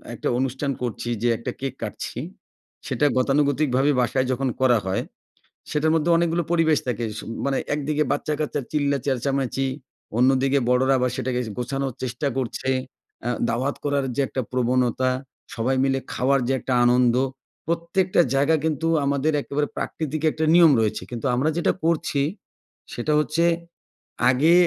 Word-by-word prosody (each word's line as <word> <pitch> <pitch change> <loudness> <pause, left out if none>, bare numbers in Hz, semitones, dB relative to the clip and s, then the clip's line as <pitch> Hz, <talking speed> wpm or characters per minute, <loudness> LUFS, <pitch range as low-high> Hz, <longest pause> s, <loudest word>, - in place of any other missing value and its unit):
একটা - - -4
অনুষ্ঠান 135 +2 -1
করছি 120 0 -3
যে 120 - +2
একটা 120 +1 -4
কেক 135 -1 -3
কাটছি 105 - -5 0.7
সেটা 150 - +1
গতানুগতিকভাবে 140 0 +2
বাসায় 130 +2 +1
যখন 130 +1 0
করা 125 -3 +5
হয়, 95 0 0 0.7
সেটার 155 +1 +2
মধ্যে 165 +2 +1
অনেকগুলো 170 0 +1
পরিবেশ 160 -3 +3
থাকে, 120 -1 -1
সু - - -6 0.2
মানে 135 -1 +1 0.2
একদিকে 150 +1 0
বাচ্চা-কাচ্চা 150 -1 -1
চিল্লা 145 -2 +1
চেঁচামেচি, 135 0 0 0.5
অন্যদিকে 135 +2 +3
বড়োরা 130 +2 +3
আবার 125 -1 +1
সেটাকে 125 0 -1 0.2
গোছানোর 135 +1 -2
চেষ্টা 130 +3 -2
করছে, 130 +1 -2 0.5
অ্যা 120 - -1 0.2
দাওয়াত 130 +5 -1
করার 140 -2 0
যে 140 - +1
একটা 130 - -3
প্রবণতা, 125 0 +1 0.5
সবাই 125 +3 0
মিলে 135 0 +1
খাওয়ার 135 +2 +2
যে 135 - +1
একটা 130 - -2
আনন্দ, 125 0 +4 0.5
প্রত্যেকটা 175 +2 +1
জায়গা 145 +4 +3
কিন্তু 160 +1 0 0.2
আমাদের 140 +2 +1
একেবারে 145 +1 -1
প্রাকৃতিক 155 -1 -3
একটা 160 0 -1
নিয়ম 170 -3 +8
রয়েছে, 110 -1 0
কিন্তু 120 +2 -5
আমরা 145 +5 +1
যেটা 170 - +2
করছি 155 -4 +1 0.7
সেটা 155 - -1
হচ্ছে 150 +2 +1 0.9
আগে 145 +7 +4
135 Hz, 145 wpm, -23 LUFS, 125-150 Hz, 0.9 s, নিয়ম